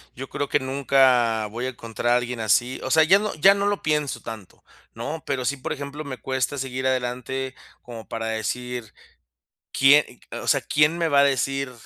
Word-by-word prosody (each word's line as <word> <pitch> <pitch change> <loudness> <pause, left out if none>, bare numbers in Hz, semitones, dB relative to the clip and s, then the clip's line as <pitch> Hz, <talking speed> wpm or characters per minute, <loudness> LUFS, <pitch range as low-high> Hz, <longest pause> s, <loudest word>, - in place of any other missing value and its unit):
"Yo 135 +2 -7
creo 145 - -3
que 145 - +2
nunca 130 -5 +2
voy 120 +4 -5
a - - -1
encontrar 120 -1 -2
a 120 - +5
alguien 120 -1 -4
así". 120 +4 +1
O 130 - -3
sea, 160 - +6
ya 185 +5 +6
no 210 0 -2
ya 190 +6 +6
no 200 - -1
lo 205 0 0
pienso 150 -2 -1
tanto, 110 -4 -10 0.3
¿no? 145 +8 -5
Pero 130 -3 -2
sí, 140 +3 0
por 130 - -4
ejemplo, 145 +1 -7
me 130 -4 -6
cuesta 130 +1 -2
seguir 130 0 -4
adelante 130 +1 -2 0.3
como 115 -2 -10
para 115 -1 -4
decir: 110 +1 -4 0.8
"¿Quién", 140 +2 +5 0.2
eh, - - -6
o - - -7
sea: - - +3
"Quién 150 +3 +2
me 165 - +1
va 140 -2 +4
a - - +5
decir 135 -1 0
130 Hz, 200 wpm, -24 LUFS, 120-145 Hz, 0.8 s, sea